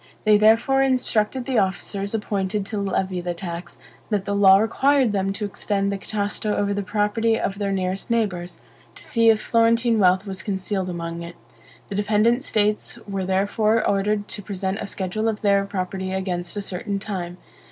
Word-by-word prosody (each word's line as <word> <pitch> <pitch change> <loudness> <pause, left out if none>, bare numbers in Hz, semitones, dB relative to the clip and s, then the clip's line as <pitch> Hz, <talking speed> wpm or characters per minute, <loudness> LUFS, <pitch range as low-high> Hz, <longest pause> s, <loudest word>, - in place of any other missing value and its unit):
They 215 -1 +5
therefore 225 +6 +4
instructed 255 -2 +1
the 260 -4 +1
officers 195 +2 -2
appointed 205 -1 -2
to 205 0 -3
levy 190 -2 -1
the 175 0 -3
tax, 170 0 -6 0.3
that 205 -3 -1
the 200 - -1
law 195 -1 +7
required 255 +3 +2
them 195 -1 0
to 210 +1 -3
extend 200 0 -1
the 200 - -2
Catasto 205 +1 -2
over 200 0 0
the 205 - -1
property 215 +3 +1
of 195 +1 -3
their 200 -1 -1
nearest 190 0 -2
neighbors, 180 -7 -1 0.4
to - - -8
see 230 -1 +3
if 220 -1 +4
Florentine 230 +1 +2
wealth 185 +1 +4
was 190 -2 -5
concealed 190 0 -2
among 170 -1 -5
it. 170 0 -8 0.5
The - - -5
dependent 215 +5 +2
states 210 -4 0
were 195 -2 -3
therefore 205 +4 +1
ordered 205 +1 0
to - - -5
present 195 0 -3
a - - -4
schedule 200 +3 -2
of 220 -2 -2
their 200 -2 +3
property 190 -1 -3
against 185 -1 -3
a 205 - -2
certain 195 +2 -3
time. 185 -4 -5
200 Hz, 175 wpm, -23 LUFS, 190-215 Hz, 0.5 s, law